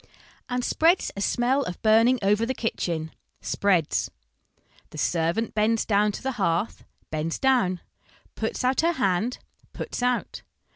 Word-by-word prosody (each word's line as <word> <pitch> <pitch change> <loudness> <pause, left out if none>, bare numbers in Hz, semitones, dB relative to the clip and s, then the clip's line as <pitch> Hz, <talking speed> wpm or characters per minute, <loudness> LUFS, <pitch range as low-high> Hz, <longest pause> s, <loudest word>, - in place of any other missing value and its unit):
And 250 0 -1
spreads 335 +3 +2
a 200 - -5
smell 250 +6 +1
of 180 -10 -5
burning 225 +4 +5
over 205 +3 +3
the 260 +3 -1
kitchen, 165 -9 -2 0.3
spreads. 185 -6 +1 0.8
The - - -11
servant 170 +7 0
bends 220 +1 +1
down 210 0 +2
to - - -7
the 265 - -1
hearth, 175 +4 0 0.3
bends 155 +1 -2
doivn. 240 -10 +2 0.5
Puts 220 +2 -3
out 255 +3 +2
her 335 +1 +2
hand, 220 - 0 0.4
puts - - -5
out. 250 0 -1
220 Hz, 140 wpm, -25 LUFS, 180-250 Hz, 0.8 s, burning